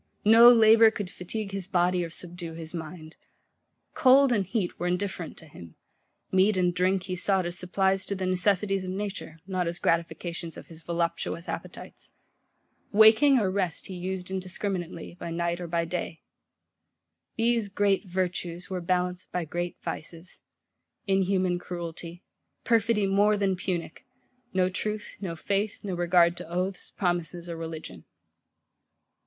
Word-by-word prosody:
No 230 +3 +9
labour 225 -1 +7
could 205 -4 -5
fatigue 200 +3 -5
his 195 -2 -4
body 180 -1 +2
or 170 - -5
subdue 170 0 -6
his 160 0 -8
mind. 160 -1 -8 0.8
Cold 275 -2 +5
and 200 -5 0
heat 195 -3 -2
were 175 - -1
indifferent 180 -2 -3
to - - -12
him: 85 - -13 0.6
meat 190 +2 +3
and 180 -1 +2
drink 185 +1 +1
he 185 -1 -4
sought 190 0 +1
as 175 0 -2
supplies 190 +1 +1
to 200 - -1
the 185 -1 -3
necessities 195 +1 +1
of 185 - -5
nature, 195 -4 -5
not 185 -2 -1
as 170 +1 -3
gratifications 170 0 -2
of - - -10
his 165 -1 -13
voluptuous 170 0 -2
appetites. - - -8 0.8
Waking 220 +6 +7
or 200 -6 +1
rest 185 -4 -2
he 190 - -7
used 185 +1 -5
indiscriminately, 185 -2 -4
by 170 - -5
night 170 +1 -2
or 175 - -4
by 170 0 0
day. 165 -1 -5 1.1
These 230 -2 +1
great 200 0 +1
Virtues 180 -1 -3
were 185 -1 -2
balanced 180 +1 -1
by 180 -2 -2
great 175 +2 -4
Vices; 165 +3 -6 0.7
inhuman 190 -2 +1
cruelty; 175 0 -7 0.4
perfidy 225 -2 +2
more 205 +2 +3
than 195 -2 +1
punic; 175 -3 -4 0.5
no 185 -1 +2
truth, 210 +3 -4
no 175 -4 -4
faith, 200 +5 -2
no 195 -2 -3
regard 175 0 +3
to - - -8
oaths, 185 +2 -3
promises, 175 -2 -2
or 170 - -5
religion. 165 -1 -7
180 Hz, 150 wpm, -27 LUFS, 170-195 Hz, 1.1 s, No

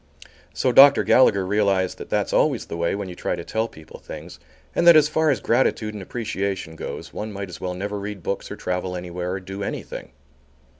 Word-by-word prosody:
So 130 - +1
Dr. 140 +3 +8
Gallagher 100 -7 +4
realized 95 -2 +1
that - - -8
that's - - 0
always - - +2
the - - -6
way 85 +2 0
when 100 -1 -4
you 90 - -7
try 90 - -2
to 85 - -6
tell 110 +5 -1
people 80 -7 -13
things, 80 +3 -10 0.3
and 170 - +2
that 170 - +10
as 150 -1 +6
far 155 +1 +1
as 135 - +2
gratitude 115 -3 +1
and 105 - -7
appreciation 100 -5 -4
goes - - -7
one 110 +1 -5
might 100 -1 -6
as 90 - -10
well 90 -1 -3
never 100 +2 -4
read 100 -2 -6
books 100 - -3
or - - -5
travel 90 0 -3
anywhere 90 0 -4
or 95 - -3
do 95 +2 -8
anything. - - -5
100 Hz, 210 wpm, -23 LUFS, 90-110 Hz, 0.3 s, that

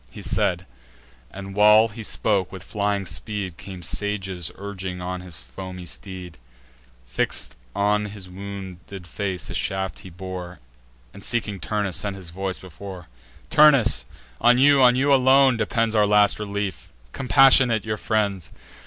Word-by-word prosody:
He - - -11
said; 90 +1 0 0.6
and 95 0 -8
while 105 +2 +6
he 110 +2 -9
spoke, 100 -3 0
with 95 -2 -9
flying 100 -2 -1
speed 95 +2 -4
Came 95 -3 -9
Sages 95 -3 -3
urging 95 -2 -6
on 90 0 -4
his 90 -3 -8
foamy 90 +1 -9
steed: 90 -3 -8 0.7
Fix'd - - -2 0.2
on 105 +1 +1
his 100 -2 -9
wounded 95 -1 -8
face 95 0 -4
a - - -5
shaft 95 0 -2
he 95 - -11
bore, 90 0 -7 0.5
And, 100 - -11
seeking 105 -4 -1
Turnus, 100 -3 -2
sent 100 -1 -2
his 90 -4 -10
voice 95 +1 -4
before: 95 -2 -10 0.4
"Turnus, 145 -7 +5 0.4
on 120 +1 +5
you, 140 +1 +5
on 125 -1 +6
you 140 +2 +3
alone, 135 0 +5
depends 115 -1 0
Our 105 -2 +4
last 105 0 +4
relief: 100 -4 -4 0.2
compassionate 130 -4 +4
your 110 -1 -2
friends! 100 -6 -1
100 Hz, 145 wpm, -23 LUFS, 90-110 Hz, 0.7 s, while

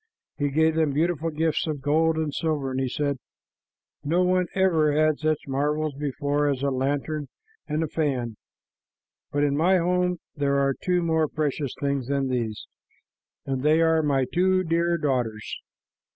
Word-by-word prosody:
He 145 -1 +1
gave 160 +3 +3
them 160 -3 +1
beautiful 165 +2 0
gifts 160 +1 0
of 150 -2 -2
gold 160 +2 +2
and 155 -2 -1
silver, 150 -5 -1
and 130 - -2
he 130 -1 0
said, 140 0 -1 0.8
"No 170 +5 +2
one 180 0 +2
ever 165 -6 +3
had 155 0 +2
such 155 -2 -1
marvels 150 +2 0
before 145 +1 -1
as 135 -2 -1
the 140 0 +1
lantern 145 +3 -1 0.4
and 155 +1 -1
the - - -1
fan, 130 -8 -1 1.0
but 145 0 +1
in 145 -1 +2
my 180 +5 +4
home 180 +1 +1 0.2
there 140 -2 +1
are 140 0 +2
two 180 +4 0
more 160 -1 +2
precious 145 -3 -2
things 140 -3 -1
than 140 -1 0
these, 115 -4 -2 0.8
and 135 -1 -2
they 155 +3 +4
are 160 -1 +4
my 140 -3 +1
two 185 +1 +3
dear 170 0 +1
daughters." 125 -8 -2
150 Hz, 165 wpm, -25 LUFS, 140-160 Hz, 1.0 s, my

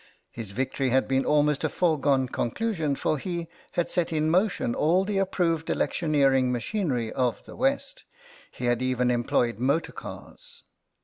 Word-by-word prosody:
His 115 -4 -7
victory 130 +5 -1
had 130 +2 +2
been 135 0 +1
almost 150 -1 +2
a 155 - +1
foregone 140 -5 +2
conclusion, 155 - -1
for 150 +2 -1
he 170 +1 -4 0.3
had 175 - -1
set 175 -2 0
in 155 0 +1
motion 185 - +1
all 175 +8 +2
the 200 -1 0
approved 170 -4 0
electioneering 135 -5 +2
machinery 125 - -1
of 125 -2 -1
the - - -11
West. 275 - -1 0.5
He 125 - -6
had 120 0 +1
even 125 -1 +1
employed 120 -2 0
motor 140 +6 +1
cars. - - -11
150 Hz, 150 wpm, -26 LUFS, 130-175 Hz, 0.5 s, had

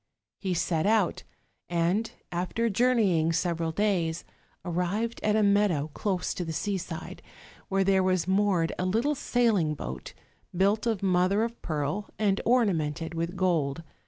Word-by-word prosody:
He 185 -3 -1
set 165 +1 0
out; 215 -4 +2 0.5
and, 175 +6 +1 0.2
after 185 +6 -1
journeying 200 -8 +3
several 165 -1 0
days, 175 -4 0 0.4
arrived 180 +7 -1
at 210 0 +2
a 215 - +3
meadow 200 -7 +2
close 190 -4 -1
to 180 - -3
the 165 - -4
seaside, 180 -3 -4 0.5
where 195 -1 +2
there 190 0 +3
was 185 -2 +1
moored 190 -4 +2
a 180 - 0
little 230 +10 +1
sailing 225 - +1
boat, 65 - -7 0.4
built 205 +4 +2
of 220 -4 -1
mother 185 +3 +2
of 235 0 -5
pearl 155 +6 -2
and 200 -2 +1
orna 235 -4 +4
mented 160 +1 -3
with 170 +2 -3
gold. 165 -5 0
185 Hz, 145 wpm, -28 LUFS, 165-210 Hz, 0.5 s, orna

